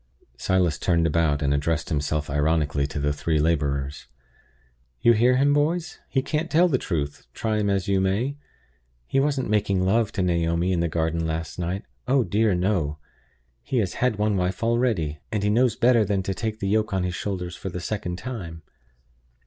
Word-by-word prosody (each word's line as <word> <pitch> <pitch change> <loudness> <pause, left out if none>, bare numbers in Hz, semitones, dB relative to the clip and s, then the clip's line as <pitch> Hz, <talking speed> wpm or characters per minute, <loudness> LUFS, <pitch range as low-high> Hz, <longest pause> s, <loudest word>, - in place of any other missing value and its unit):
Silas 90 +2 +1
turned 85 -2 +2
about, 80 -2 +1
and 70 0 +2
addressed 75 +1 -1
himself 75 0 -1
ironically 75 -1 +1
to 75 - -6
the 75 0 0
three 80 +2 -1
laborers. 70 -3 -1 0.9
"You 120 - +5
hear 125 +3 +4
him, 140 +2 +4
boys? 160 +4 0
He 135 -1 0
can't 160 +3 -2
tell 170 +3 +4
the 135 -7 +1
truth, 75 - -3
try 110 -1 -1
him 100 -1 +1
as 100 0 0
you 95 -1 +2
may. 105 +9 0 0.7
He 135 - +1
wasn't 140 -2 0
making 100 -3 +1
love 110 +2 +2
to 95 - 0
Naomi 85 0 +1
in 85 - 0
the 85 - +1
garden 80 0 -1
last 80 +1 -4
night 90 +3 -3 0.2
oh 130 0 +3
dear, 105 -2 +2
no! 90 -5 0 0.6
He 130 - -3
has 100 -6 0
had 125 -2 +2
one 105 0 +1
wife 90 +4 -1
already; 115 - +1
and 105 - -1
he 105 - +2
knows 120 +1 +3
better 120 -2 +4
than 100 -1 0
to 95 - -2
take 110 +2 -3
the 100 - -2
yoke 105 -1 +1
on 95 - 0
his 90 -1 -2
shoulders 90 -1 -4
for 95 - -6
the 90 - -5
second 90 -1 -3
time!" 90 -10 -7
95 Hz, 190 wpm, -24 LUFS, 80-110 Hz, 0.9 s, You